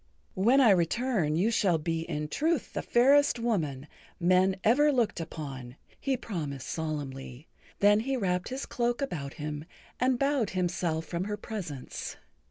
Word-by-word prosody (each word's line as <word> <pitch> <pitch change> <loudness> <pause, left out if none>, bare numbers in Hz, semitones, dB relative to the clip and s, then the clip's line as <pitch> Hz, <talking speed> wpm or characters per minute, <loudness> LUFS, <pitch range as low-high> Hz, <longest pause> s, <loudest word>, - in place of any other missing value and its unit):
"When 235 +9 +4
I 235 -5 +7
return 185 - +1
you 195 +8 +2
shall 190 -6 +3
be 165 +1 -2
in 150 0 -2
truth 310 - -1
the - - -2
fairest 275 +3 +4
woman 160 - -1 0.3
men 185 +2 +4
ever 290 +7 +5
looked 240 -9 +1
upon," 135 -6 -7 0.2
he 270 -2 0
promised 150 - -5
solemnly. 145 -3 -5 0.3
Then 205 +1 +6
he 265 +4 -1
wrapped 180 -5 -1
his 260 +2 -4
cloak 240 +2 -1
about 145 - -4
him 150 0 -5 0.4
and 255 0 +2
bowed 275 -5 +1
himself 175 -3 -1
from 170 +3 -3
her 210 0 -3
presence. 170 - -6
185 Hz, 150 wpm, -29 LUFS, 155-240 Hz, 0.4 s, I